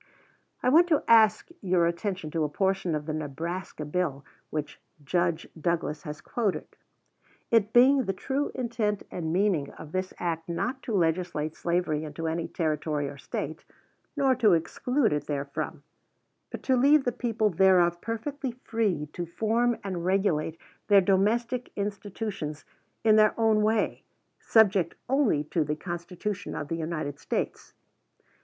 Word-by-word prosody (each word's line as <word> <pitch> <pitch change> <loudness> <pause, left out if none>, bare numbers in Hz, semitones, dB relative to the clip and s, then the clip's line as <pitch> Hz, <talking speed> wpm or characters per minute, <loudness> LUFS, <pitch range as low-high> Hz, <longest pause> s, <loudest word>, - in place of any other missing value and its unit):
I - - +4
want 335 +6 +6
to 310 -4 +2
ask 220 +1 +5
your 180 -3 +2
attention 170 -1 -2
to 165 -1 0
a 150 - 0
portion 190 0 0
of 150 -1 -4
the 155 - -3
Nebraska 155 +2 -4
bill 150 -3 -2 0.2
which 150 -1 -5 0.2
Judge 175 +2 0
Douglas 160 -2 -1
has 150 0 -6
quoted: 220 -6 -1 0.9
"It 220 -2 +3
being 260 +2 +6
the 195 - 0
true 270 +9 -2
intent 225 -5 -1
and 160 -3 -3
meaning 180 -6 +1
of 155 - -11
this 185 +1 -2
Act 165 -1 -3
not 250 +10 -2
to 225 - -3
legislate 165 -3 0
slavery 170 -3 0
into 155 +2 -6
any 165 +1 -2
Territory 155 -3 -1
or 140 0 -8
State, 155 +3 -5 0.5
nor 270 -2 +4
to 220 -6 +5
exclude 240 - +1
it 150 - -2
therefrom, 140 -1 -4 0.7
but - - -7
to 260 - +3
leave 280 +3 +5
the 245 - 0
people 225 -3 0
thereof 175 -1 +4
perfectly 255 +3 -4
free 225 -10 -1
to 175 -1 -4
form 225 +7 +1
and 185 -4 -4
regulate 175 -4 +1 0.3
their 200 -2 +7
domestic 230 +6 +1
institutions 200 -6 -4 0.4
in 215 -1 +5
their 215 +1 +4
own 220 -1 +4
way, 215 0 +1 0.4
subject 200 -6 +3
only 255 - +2
to 155 +2 0
the 150 0 -2
Constitution 175 +4 -5
of 145 -1 -5
the 165 - -2
United 155 -3 -4
States." - - -3
185 Hz, 150 wpm, -27 LUFS, 160-225 Hz, 0.9 s, their